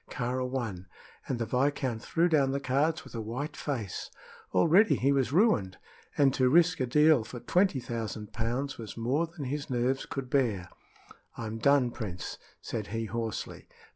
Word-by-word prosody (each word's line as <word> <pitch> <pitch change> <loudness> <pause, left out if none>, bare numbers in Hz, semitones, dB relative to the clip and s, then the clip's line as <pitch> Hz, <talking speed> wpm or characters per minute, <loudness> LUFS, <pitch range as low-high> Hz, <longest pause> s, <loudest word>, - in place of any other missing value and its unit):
Kāra 125 0 -2
won, 110 -9 -4 0.4
and 130 - -1
the 115 - -1
viscount 130 -1 0
threw 170 +7 +1
down 145 -5 +3
the 140 +1 -1
cards 140 +4 +1
with - - -14
a 115 - -3
white 135 +7 -4
face. 120 -11 -4 0.4
Already 160 - +5
he 135 +2 +2
was 135 -3 +1
ruined, 155 - +3 0.4
and 140 -2 +4
to 130 -2 +3
risk 170 +3 +4
a 130 - 0
deal 150 0 +5
for 120 +2 -8
twenty 180 +1 +2
thousand 110 -3 -5
pounds 125 +5 -2
was 110 -1 -8
more 135 +9 0
than 165 -3 -7
his 140 +2 -4
nerves 130 +1 0
could 135 -2 -4
bear. 115 - 0 0.7
"I'm 115 -1 -5
done, 135 0 +4
Prince," 95 -8 -6 0.2
said 110 -3 -4
he, 115 +1 -3
hoarsely. 115 +1 -4
130 Hz, 170 wpm, -29 LUFS, 115-145 Hz, 0.7 s, Already